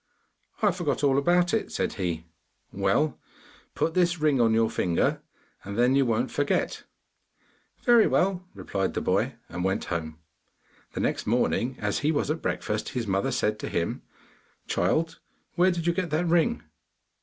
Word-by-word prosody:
'I 205 - +5
forgot 170 -5 -2
all 140 -1 +4
about 175 +5 +2
it,' 225 - 0
said - - -1
he. 85 -5 -3 0.5
'Well, 100 +10 +1 0.6
put 165 - 0
this 175 -1 +2
ring 150 -4 +3
on 115 -1 +4
your 115 0 +3
finger, 90 -5 0 0.4
and 100 +1 -6
then 125 +2 +4
you 135 -2 +3
won't 120 +3 0
forget.' 145 0 -1 1.0
'Very 240 -3 +6
well,' 185 -1 +1
replied 95 -1 -2
the - - -1
boy, - - 0
and 90 +2 -5
went 95 0 0
home. 80 -2 -4 0.8
The - - -3
next - - -1
morning, 125 +2 +1
as 105 -1 -1
he 150 - +1
was 150 -1 0
at 160 - -3
breakfast, 105 0 -2
his 120 -3 -3
mother 100 +5 0
said 105 -4 0
to - - -4
him, 85 - -2 0.6
'Child, 165 +1 0 0.3
where 180 +2 +4
did 170 -2 -2
you 170 - +2
get 180 0 -2
that 155 +4 0
ring? 165 - +2
135 Hz, 165 wpm, -27 LUFS, 105-170 Hz, 1.0 s, Very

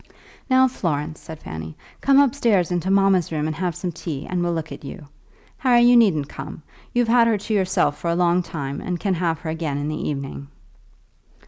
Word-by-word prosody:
"Now, 260 0 +5
Florence," 155 - -3
said 160 -1 -9
Fanny, 80 -1 -7 0.2
"come 275 0 +5
upstairs 235 - +2
into 175 +1 -1
mamma's 195 -3 +3
room 155 -1 -1
and 155 0 -2
have 175 0 -2
some 180 - -3
tea, 155 -4 -6
and 180 -1 -1
we'll 175 0 0
look 160 -1 -4
at - - -9
you. 170 -6 -8 0.5
Harry, 250 -5 +4
you 245 0 +6
needn't 185 -12 +4
come. 155 - -9 0.3
You've 245 -1 +1
had 235 0 +5
her 225 -2 +2
to 210 +2 -4
yourself 185 -7 +1
for 170 - -2
a 170 - +1
long 175 0 +3
time, 140 -5 -5
and 180 -1 -3
can 195 +1 0
have 165 -3 -1
her 160 - -3
again 160 -3 -3
in 145 +1 -2
the 155 - -3
evening." 140 -1 -5
175 Hz, 205 wpm, -22 LUFS, 155-205 Hz, 0.5 s, you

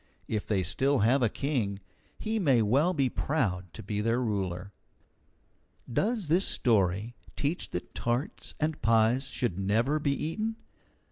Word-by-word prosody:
If 105 -2 -2
they 105 - +1
have 95 - 0
still 135 +8 +1
a 120 +1 +4
king, 120 -7 -1 0.4
he 220 0 -2
may 135 - +4
well 140 - +3
be 140 -7 +1
proud 95 - -1
to - - -9
be 105 +1 -2
their 115 +3 +1
ruler. 100 -4 -2 1.2
Does 215 - 0
this 175 +6 +4
story 105 -1 +1 0.2
teach 150 +5 -2
that 90 - -5
tarts 120 +4 -2
and 155 0 -1
pies 115 +4 +3
should 120 -7 -2
never 115 +10 +1
be 145 -2 +1
eaten? 215 +11 -2
120 Hz, 145 wpm, -29 LUFS, 105-150 Hz, 1.2 s, a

